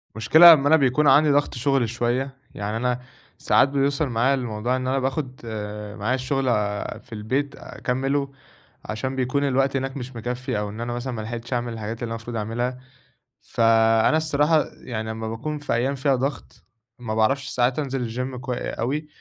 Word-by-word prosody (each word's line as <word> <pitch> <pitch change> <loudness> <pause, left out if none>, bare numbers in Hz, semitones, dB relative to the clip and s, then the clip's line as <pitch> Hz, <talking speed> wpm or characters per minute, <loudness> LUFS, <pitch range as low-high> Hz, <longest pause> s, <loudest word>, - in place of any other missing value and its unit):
المشكلة 160 +11 +8
أما 145 -2 +2
أنا 160 - +6
بيكون 145 0 +3
عندي 145 +3 +6
ضغط 145 +1 +2
شغل 130 -2 +1
شوية، 125 +3 -1 0.2
يعني 105 +2 -3
أنا 125 +1 0 0.4
ساعات 135 - +3
بيوصل 140 +2 +1
معايا 120 +3 +2
الموضوع 120 -2 -1
إن 130 0 -3
أنا 135 +1 +1
باخد 130 0 -3 0.6
معايا 110 +5 +1
الشغل 135 +1 -1 0.6
في - - -26
البيت 130 +7 -2
أكمّله، 135 +2 -2 0.5
عشان 130 +5 -3
بيكون 130 +2 0
الوقت 135 0 +1
هناك 135 +1 -3
مش 130 -1 -7
مِكفّي، 120 -1 -3
أو 105 0 -3
إن 110 +3 -7
أنا 120 0 -3
مثلًا 125 +2 -4
ما 110 - -4
لحقتش 115 +2 -5
أعمل 120 -1 -2
الحاجات 110 0 -5
اللي - - 0
أنا - - -2
المفروض 115 +1 -7
أعملها، 120 +4 -2 0.6
فَأنا 115 +4 +3
الصراحة 155 0 +2 0.2
يعني 110 -3 -4
أمّا 110 0 -5
باكون 115 +8 -4
في 145 - -2
أيام 130 +4 0
فيها 135 0 +2
ضغط، 135 +3 -4 0.4
ما 110 -3 -4
باعرفش 135 +5 +1
ساعات 125 +3 +1
أنزل 135 -3 -2 0.3
الچيم، - - -6
كو 130 +1 -5
أوي، 140 +5 -3
130 Hz, 175 wpm, -24 LUFS, 115-140 Hz, 0.6 s, المشكلة